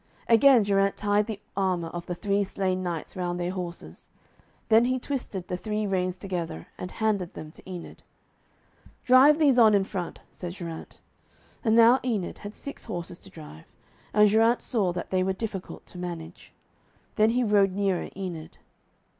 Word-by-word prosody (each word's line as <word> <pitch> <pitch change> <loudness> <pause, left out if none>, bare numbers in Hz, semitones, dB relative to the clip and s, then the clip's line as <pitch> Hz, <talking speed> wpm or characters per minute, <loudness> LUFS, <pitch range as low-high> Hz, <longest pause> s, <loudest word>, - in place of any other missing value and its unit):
Again 235 0 +6
Geraint 195 0 +2
tied 205 0 +1
the 215 -3 -5 0.2
armour 185 -4 0
of 175 0 -7
the 175 - -3
three 200 +2 0
slain 190 -1 -1
knights 170 -3 -4
round 175 -1 -2
their 175 0 -1
horses. 180 -2 -7 0.6
Then 225 +1 +5
he 255 +1 +1
twisted 245 -9 -4
the 180 - -3
three 210 +2 -2
reins 185 -2 0
together, 175 - -5
and 180 - -6
handed 205 -5 -1
them 155 - -8
to 190 - -14
Enid. 180 -2 -8 1.0
'Drive 265 +4 +7
these 280 -6 +4
on 220 -3 +7
in 200 - +3
front,' 185 -3 -5
said 175 -1 -7
Geraint. 170 -3 -8 0.7
And 220 -3 +3
now 235 +3 +7
Enid 220 -8 -2
had 205 +1 -8
six 280 - -8
horses 175 -5 -5
to 195 - -11
drive, 150 - -13 0.4
and 210 0 +6
Geraint 225 +3 +3
saw 205 -7 0
that 175 0 -6
they 185 -1 +2
were 190 +1 +1
difficult 195 -2 -6
to 180 - -11
manage. 170 -2 -7 0.6
Then 215 0 +4
he 245 +2 +1
rode 200 -3 +3
nearer 195 -2 -1
Enid. 175 -5 -6
195 Hz, 170 wpm, -27 LUFS, 180-220 Hz, 1.0 s, Drive